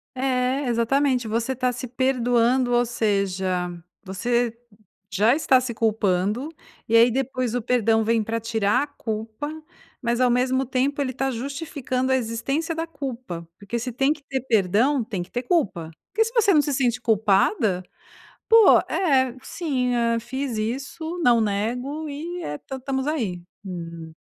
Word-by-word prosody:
É, 260 Hz, +1 st, 0 dB
exatamente. 250 Hz, +1 st, +1 dB
Você 230 Hz, +4 st, -1 dB
tá 255 Hz, -1 st, +1 dB
se 250 Hz, +1 st, -5 dB
perdoando, 245 Hz, 0 st, +2 dB
ou 240 Hz, 0 st, +4 dB
seja, 190 Hz, -5 st, -1 dB, 0.3 s
você 235 Hz, +4 st, -1 dB, 0.5 s
já 210 Hz, +7 st, +3 dB
está 265 Hz, -4 st, +4 dB
se 250 Hz, -1 st, -4 dB
culpando 215 Hz, -, 0 dB, 0.4 s
e 230 Hz, -, +4 dB
aí 235 Hz, +2 st, +7 dB
depois 255 Hz, -1 st, -1 dB
o 245 Hz, -, -1 dB
perdão 225 Hz, -2 st, +2 dB
vem 230 Hz, 0 st, +2 dB
para 225 Hz, +2 st, -2 dB
tirar 225 Hz, +2 st, +1 dB
a -, -, -2 dB
culpa, 225 Hz, 0 st, -5 dB, 0.5 s
mas 235 Hz, +1 st, 0 dB
ao 250 Hz, -1 st, +4 dB
mesmo 255 Hz, +2 st, +2 dB
tempo 270 Hz, +3 st, 0 dB
ele 260 Hz, -2 st, -1 dB
tá 270 Hz, 0 st, -1 dB
justificando 265 Hz, 0 st, -3 dB
a -, -, +5 dB
existência 275 Hz, +8 st, -2 dB
da 325 Hz, +1 st, -3 dB
culpa. 255 Hz, -, -6 dB
Porque 205 Hz, +3 st, -4 dB
se 245 Hz, +2 st, -4 dB
tem 270 Hz, +4 st, +2 dB
que 305 Hz, -, -8 dB
ter 265 Hz, -1 st, -2 dB
perdão, 230 Hz, +4 st, +2 dB
tem 210 Hz, -6 st, -4 dB
que 175 Hz, -, -11 dB
ter 245 Hz, -, -2 dB
culpa. 200 Hz, -, 0 dB, 0.2 s
Porque 445 Hz, +3 st, +3 dB
se 455 Hz, -, -5 dB
você 435 Hz, -4 st, +4 dB
não 305 Hz, -, +5 dB
se 290 Hz, -, -2 dB
sente 245 Hz, -3 st, +1 dB
culpada. 210 Hz, -, +2 dB, 0.7 s
"Pô, 455 Hz, -1 st, +8 dB
é, 265 Hz, -8 st, +2 dB
sim, 260 Hz, -7 st, -1 dB
hã, 230 Hz, -1 st, +1 dB
fiz 260 Hz, 0 st, -4 dB
isso, 280 Hz, +10 st, -4 dB
não 240 Hz, -2 st, +5 dB
nego 245 Hz, +9 st, -2 dB
e 335 Hz, +5 st, -5 dB
é 150 Hz, -, -4 dB
tam 265 Hz, -, -7 dB
estamos 265 Hz, +1 st, -2 dB
aí." 215 Hz, -, -2 dB, 0.2 s
Hum. 170 Hz, -3 st, -7 dB
245 Hz, 160 wpm, -24 LUFS, 220-270 Hz, 0.7 s, Pô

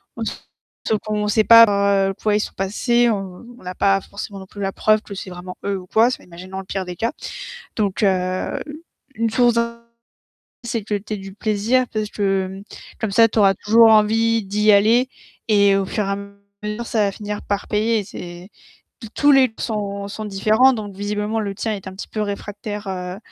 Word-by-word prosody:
en -, -, -4 dB
tout, -, -, -2 dB, 0.5 s
sauf 220 Hz, -, +2 dB
qu'on 210 Hz, -1 st, -1 dB
sait 215 Hz, +1 st, +3 dB
par 200 Hz, -4 st, +5 dB
quoi 210 Hz, -1 st, 0 dB
ils -, -, +2 dB
sont -, -, -4 dB
passés, 235 Hz, +5 st, +1 dB
on 195 Hz, 0 st, -4 dB
on -, -, -17 dB
n'a 180 Hz, 0 st, -6 dB
pas 195 Hz, -1 st, +2 dB
forcément 200 Hz, 0 st, -8 dB
non 190 Hz, -, -10 dB
plus 205 Hz, -, -10 dB
la 195 Hz, 0 st, -1 dB
preuve 215 Hz, +1 st, +2 dB
que 200 Hz, -, -9 dB
c'est 190 Hz, -1 st, -7 dB
vraiment 180 Hz, 0 st, -9 dB
eux 200 Hz, -1 st, -1 dB
ou 180 Hz, -, -9 dB
quoi. 225 Hz, +6 st, +3 dB
C'est -, -, -5 dB
m -, -, -20 dB
imaginons 185 Hz, +3 st, -9 dB
le 190 Hz, -, -8 dB
pire 190 Hz, -1 st, -4 dB
des 180 Hz, 0 st, -6 dB
cas. 230 Hz, +6 st, -1 dB, 0.6 s
Donc 205 Hz, -1 st, -1 dB
heu, 185 Hz, -1 st, 0 dB, 0.6 s
une 230 Hz, 0 st, 0 dB
source 240 Hz, +1 st, +3 dB
d'in 235 Hz, 0 st, -1 dB, 0.8 s
c'est 230 Hz, -2 st, -3 dB
que 210 Hz, 0 st, -2 dB
tu 205 Hz, +2 st, -5 dB
aies 210 Hz, -, -2 dB
du 195 Hz, 0 st, -9 dB
plaisir 220 Hz, +5 st, +1 dB
parce 215 Hz, -1 st, -2 dB
que, 195 Hz, -2 st, 0 dB
mmh, 190 Hz, +1 st, -9 dB, 0.4 s
comme 220 Hz, -3 st, -2 dB
ça 225 Hz, +2 st, +5 dB
tu 220 Hz, -, 0 dB
auras 195 Hz, -1 st, +5 dB
toujours 225 Hz, +4 st, +5 dB
envie 225 Hz, +1 st, +3 dB
d'y 210 Hz, +2 st, +2 dB
aller 225 Hz, +5 st, +4 dB, 0.4 s
et 200 Hz, -2 st, +4 dB
au 195 Hz, -, 0 dB
fur 210 Hz, +3 st, -2 dB
et -, -, -4 dB
à 200 Hz, -, -1 dB, 0.5 s
mesure, 210 Hz, +3 st, -4 dB
ça 220 Hz, -3 st, +1 dB
va 200 Hz, -, 0 dB
finir 210 Hz, +1 st, -6 dB
par 200 Hz, 0 st, -3 dB
payer 220 Hz, +1 st, +1 dB
et -, -, -4 dB
c'est 180 Hz, -1 st, -9 dB, 0.5 s
tous 225 Hz, -, -9 dB
tous 290 Hz, 0 st, +4 dB
les 270 Hz, -1 st, +6 dB
p 225 Hz, -, -18 dB
sont 200 Hz, -3 st, -3 dB
sont 215 Hz, +1 st, -6 dB
différents 215 Hz, +6 st, +3 dB
donc 205 Hz, -4 st, -6 dB
visiblement 210 Hz, +2 st, -2 dB
le 200 Hz, -2 st, -3 dB
tien 220 Hz, +1 st, -2 dB
est 195 Hz, -2 st, -7 dB
un 190 Hz, -, -7 dB
petit 190 Hz, -, -8 dB
peu 215 Hz, -, -3 dB
réfractaire, 205 Hz, 0 st, -5 dB
heu, 180 Hz, 0 st, -4 dB
205 Hz, 215 wpm, -21 LUFS, 195-220 Hz, 0.8 s, les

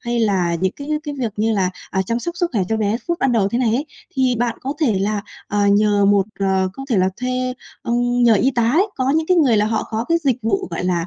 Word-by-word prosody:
hay 240 Hz, -1 st, -2 dB
là 190 Hz, -6 st, +1 dB
những 190 Hz, +1 st, +1 dB
cái 285 Hz, 0 st, -9 dB, 0.2 s
cái 295 Hz, -2 st, -4 dB
việc 230 Hz, -4 st, -2 dB
như 220 Hz, +2 st, +1 dB
là, 190 Hz, -3 st, +1 dB, 0.2 s
à, 190 Hz, -, 0 dB
chăm 230 Hz, +5 st, -2 dB
sóc 345 Hz, +7 st, -5 dB
sức 345 Hz, -1 st, 0 dB
khỏe 210 Hz, -6 st, +1 dB
cho 225 Hz, -, 0 dB
bé 215 Hz, 0 st, 0 dB
phút 340 Hz, 0 st, 0 dB
ban 270 Hz, -, +2 dB
đầu 210 Hz, -4 st, +2 dB
thế 235 Hz, -, -1 dB
này 235 Hz, -3 st, +2 dB
ấy, 285 Hz, +5 st, -1 dB, 0.3 s
thì 260 Hz, -2 st, +2 dB
bạn 235 Hz, -1 st, -1 dB
có 270 Hz, -, -3 dB
thể 230 Hz, -11 st, +2 dB
là, 205 Hz, +2 st, 0 dB, 0.3 s
ờ, 205 Hz, 0 st, +1 dB
nhờ 205 Hz, 0 st, +3 dB
một, 200 Hz, -1 st, +3 dB
ờ 190 Hz, -1 st, +1 dB
có 270 Hz, -, -8 dB
thể 225 Hz, -, +3 dB
là 185 Hz, 0 st, +3 dB
thuê, 255 Hz, 0 st, -1 dB, 0.3 s
ừm, 245 Hz, +1 st, 0 dB
nhờ 235 Hz, -2 st, +6 dB
y 255 Hz, +6 st, +3 dB
tá 235 Hz, -3 st, +1 dB
ấy, 365 Hz, +8 st, +3 dB
có 260 Hz, 0 st, +1 dB
những 320 Hz, 0 st, +1 dB
cái 365 Hz, -, +3 dB
người 265 Hz, -9 st, +4 dB
là 210 Hz, -, +2 dB
họ 220 Hz, 0 st, 0 dB
có 225 Hz, +1 st, -2 dB
cái 335 Hz, 0 st, +3 dB
dịch 265 Hz, -4 st, +2 dB
vụ 380 Hz, -, 0 dB
gọi -, -, -3 dB
là, 175 Hz, -2 st, 0 dB
230 Hz, 275 wpm, -20 LUFS, 200-255 Hz, 0.3 s, nhờ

